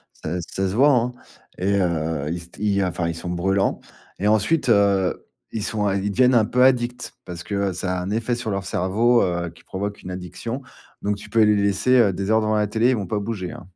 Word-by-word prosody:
ça 85 +3 -4
ça 95 +3 -3
se 95 - -3
voit, 140 +6 +5
hein 125 -2 +2 0.5
et 100 +2 +1
heu, 80 -4 -1
ils 85 0 -4
st 85 - -15
ils, 100 -1 +1
heu, - - +2
enfin 85 -1 -2
ils 85 - -2
sont 85 - -6
brûlants 95 +3 0 0.4
et 100 - -1
ensuite, 110 +7 +2
heu, 100 -3 +2 0.2
ils 110 -2 -3
sont 105 -2 -1
un 100 - +1
ils 100 +1 -1
deviennent 125 +5 +3
un 115 -3 +5
peu 125 +3 +2
addicts 125 -2 +1
parce 85 0 -8
que 100 -1 -1
ça 90 0 -2
a - - -3
un 90 - -4
effet 115 +3 -1
sur 120 -2 -3
leur 100 -1 -2
cerveau, 110 +7 +2
heu, 85 -1 -1
qui - - -20
provoque 100 +2 -5
une 90 - -8
addiction 105 +8 -6 0.4
donc 100 0 0
tu - - -12
peux 115 - +3
les 105 0 +4
laisser, 100 +4 +1
heu, 100 -5 +4
des 100 +3 -2
heures 110 0 +4
devant 110 0 +1
la 105 0 +2
télé, 110 +4 +1
ils 130 - +3
vont 100 -3 -3
pas 105 +3 -2
bouger, 100 -4 -4
hein. 90 - -10
100 Hz, 245 wpm, -22 LUFS, 90-110 Hz, 0.5 s, voit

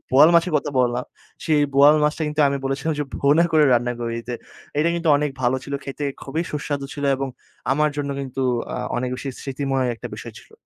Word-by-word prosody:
বোয়াল 145 +5 +8
মাছের 170 +1 +4
কথা 145 0 -2
বললাম 125 0 0 0.4
সেই 155 -3 +3
বোয়াল 145 +2 +7
মাছটা 150 +2 0
কিন্তু 150 +1 -1
আমি 140 - 0
বলেছিলাম 135 +4 -1
যে 150 - 0
ভুনা 145 +4 +4
করে 155 -1 +6
রান্না 120 0 +1
করে 115 -1 -2
দিতে। 120 +1 -5 0.4
এটা 155 - +3
কিন্তু 170 -1 -1
অনেক 150 0 0
ভালো 125 +2 +2
ছিল 140 - -5
খেতে, 140 +2 -5 0.2
খুবই 155 +5 -2
সুস্বাদু 145 -1 -3
ছিল 145 - -4
এবং 135 0 -3 0.4
আমার 150 +2 +2
জন্য 140 -1 -2
কিন্তু 135 -1 -4 0.3
আ - - -3 0.2
অনেক 125 +1 -1
বেশি 135 +2 -6
স্মৃতিময় 135 -1 -1
একটা 115 - -8
বিষয় - - -9
ছিল। - - -22
140 Hz, 205 wpm, -22 LUFS, 130-150 Hz, 0.4 s, বোয়াল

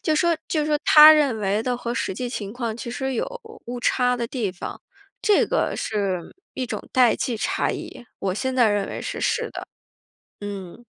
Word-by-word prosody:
就 310 - +1
说 340 0 +2
就 305 -2 0
说 305 -1 +2
他 305 0 +10
认 285 -7 +2
为 205 +1 0
的 250 0 -1
和 240 0 -4
实 230 - -2
际 250 +6 -4
情 205 -4 -5
况 235 -2 -4
其 235 - -6
实 265 +2 -3
有 230 - 0 0.4
误 245 +1 -5
差 250 0 +2
的 235 -1 -2
地 230 -5 -2
方。 180 - -8 0.4
这 420 -1 +4
个 - - 0
是 195 -5 -2 0.2
一 255 - -3
种 215 -3 -5
代 250 -2 +5
际 240 -3 -2
差 - - 0
异， - - -7
我 190 -1 -2
现 260 +4 -2
在 240 -4 +4
认 205 -1 0
为 - - -5
是 - - -5
是 - - 0
的。 - - -7 0.7
嗯。 200 +2 -7
240 Hz, 215 characters per minute, -23 LUFS, 205-260 Hz, 0.7 s, 他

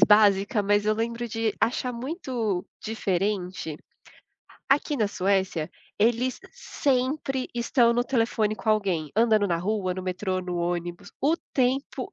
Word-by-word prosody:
básica, 205 0 +5
mas 205 +1 +3
eu 215 0 +2
lembro 235 +1 -2
de 225 -1 -1
achar 250 +1 0
muito 240 - -3
diferente, 190 -5 -2 0.9
aqui 285 +1 +2
na 215 -4 +1
Suécia, 190 -5 0 0.3
eles 240 +4 +2
sempre 270 - -1
estão 235 0 +3
no 245 +1 +1
telefone 225 -4 +1
com 220 - -6
alguém, 190 -8 0
andando 220 -2 +4
na 170 - +1
rua, 185 +1 -1
no 185 - -5
metrô, 185 0 -2
no 180 -1 -4
ônibus, 175 +2 -3
o 305 +4 +3 0.2
tempo 270 +9 0
215 Hz, 135 wpm, -26 LUFS, 190-245 Hz, 0.9 s, básica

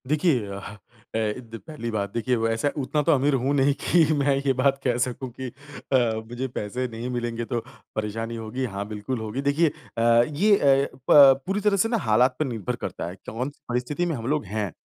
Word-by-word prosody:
देखिए 150 - +2
अ 100 0 -6 0.6
अ, - - +2
द 115 +1 -3
पहली 150 -7 -5
बात 100 -2 -2
देखिए 125 +2 0
वैसे 115 +4 0
उतना 150 +3 0
तो - - +6
अमीर 140 +1 +3
हूँ 135 +2 +1
नहीं 140 0 +3
कि 175 -2 +4
मैं 140 -1 +2
ये 135 - +3
बात 135 0 +3
कह 120 -2 +1
सकूँ 125 +1 -2
कि 130 - -3 0.5
अ, 115 -4 +2
मुझे 125 +2 -3
पैसे 125 +1 -3
नहीं 115 +2 -5
मिलेंगे 120 -1 -3
तो 120 0 -2 0.4
परेशानी 115 +2 -3
होगी 115 +3 -4
हाँ, 100 -3 -4
बिल्कुल 105 +4 -4
होगी। 110 +4 -4
देखिए 145 +4 +2 0.3
अ, - - 0 0.3
ये 195 +8 +3
अ, 140 -3 +4 0.2
प 135 -2 +8
पूरी 195 +2 0
तरह 205 -1 +2
से 225 +4 +2
ना 230 - +1
हालात 125 +4 +4
पर 155 - +1
निर्भर 115 -8 -3
करता - - -4
है 90 - -8
कौन-सी 125 +6 -5
परिस्थिति 125 +8 -1
में 170 -3 -1
हम 115 -2 -5
लोग 150 -3 0
हैं। 105 -1 -3
125 Hz, 205 wpm, -25 LUFS, 115-140 Hz, 0.6 s, प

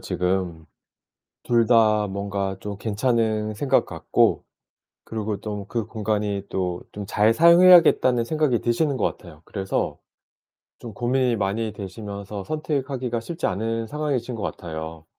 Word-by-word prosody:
지금. 90 -3 -2 0.8
둘 115 -1 +3
다 110 -2 +4
뭔가 100 -1 -3
좀 100 -1 -6
괜찮은 110 -1 0
생각 135 +4 +2
같고 - - +1 0.6
그러고 105 -2 -4
좀 105 -2 -5
그 115 -3 -2
공간이 105 -2 -2
또 90 -2 -2
좀 100 -1 -6
잘 105 +3 +3
사용해야겠다는 170 -6 +6
생각이 150 -3 +1
드시는 135 +4 0
것 110 - -1
같아요. 80 -3 -15
그래서 95 -2 -3 0.8
좀 115 - -8
고민이 125 +2 +1
많이 105 +2 -1
되시면서 100 0 -7
선택하기가 135 -6 -2
쉽지 165 +8 -4
않은 115 +3 -2
상황이신 135 -3 -2
것 110 - -6
같아요. 80 -2 -6
110 Hz, 285 characters per minute, -24 LUFS, 100-125 Hz, 0.8 s, 사용해야겠다는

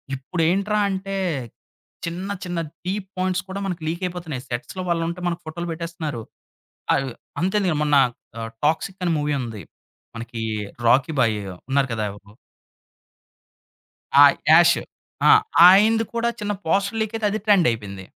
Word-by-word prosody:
ఇప్పుడేంట్రా 180 +9 0
అంటే, 195 0 -3 0.9
చిన్న, 180 +4 -4
చిన్న 175 -1 -4 0.3
డీప్ 195 0 -3
పాయింట్స్ 185 0 0
కూడా 195 +1 -4
మనకు 180 -3 -4
లీకయిపోతున్నాయి. 170 -5 -4
సెట్స్‌లో 140 +9 -4
వాళ్ళుంటే, 170 +1 -1
మనకు 170 -1 -4
ఫోటోలు 170 +2 -5
పెట్టేస్తున్నారు. 160 -6 -5 0.7
అవి 135 - -1 0.3
అంతెందుకు 185 -3 +1
మొన్న 150 -1 +2 0.5
ఆహ్, 115 - -5
'టాక్సిక్' 165 +5 0
అని 175 - +1
మూవీ 150 0 -1
ఉంది. 115 -5 -6 0.5
మనకి 115 0 -6 0.4
రాకీ 135 +6 +4
భాయియో 105 -6 0 0.2
ఉన్నారు 140 0 +2
కదా 110 -1 -2
ఎవరు... 100 0 -15 1.9
ఆహ్, 140 - +7 0.2
యాషు 170 +1 +6 0.5
ఆహ్, - - +7 0.3
ఆయనది 220 +4 +5
కూడా 235 0 0
చిన్న 205 0 -2
పోస్టర్ 200 +6 +1
లీకయితే 220 0 -2
అది 215 - -2
ట్రెండయిపోయింది. 115 - +1
170 Hz, 125 wpm, -22 LUFS, 135-190 Hz, 1.9 s, ఆహ్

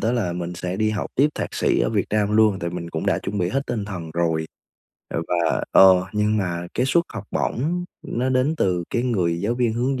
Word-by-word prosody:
đó 115 +2 +1
là 105 -8 0
mình 90 0 -4
sẽ 90 +1 -4
đi 110 +1 +1
học 105 - -2
tiếp 145 +3 +4
thạc - - -4
sĩ - - +2
ở - - +1
Việt 105 -4 +1
Nam 105 0 +1
luôn, 110 -3 +4
tại 85 -1 -3
mình 85 -1 -6
cũng 80 - -3
đã - - +2
chuẩn 100 +1 -4
bị 90 - +1
hết 135 +8 0
tinh 110 -4 -2
thần 90 -6 -6
rồi. 80 -2 0 0.6
Ờ, 85 - -2
và, 85 -2 +1
ờ, 95 -1 +7
nhưng 105 +1 +1
mà 90 -4 -2
cái 125 - +1
suất 170 +6 +3
học 110 -2 -6
bổng 170 +8 -1 0.2
nó 125 +2 -2
đến 130 +5 +1
từ 90 - 0
cái 120 - 0
người 90 -9 0
giáo 110 +4 0
viên 120 -2 +1
hướng 125 +3 -1
105 Hz, 240 wpm, -23 LUFS, 90-120 Hz, 0.6 s, ờ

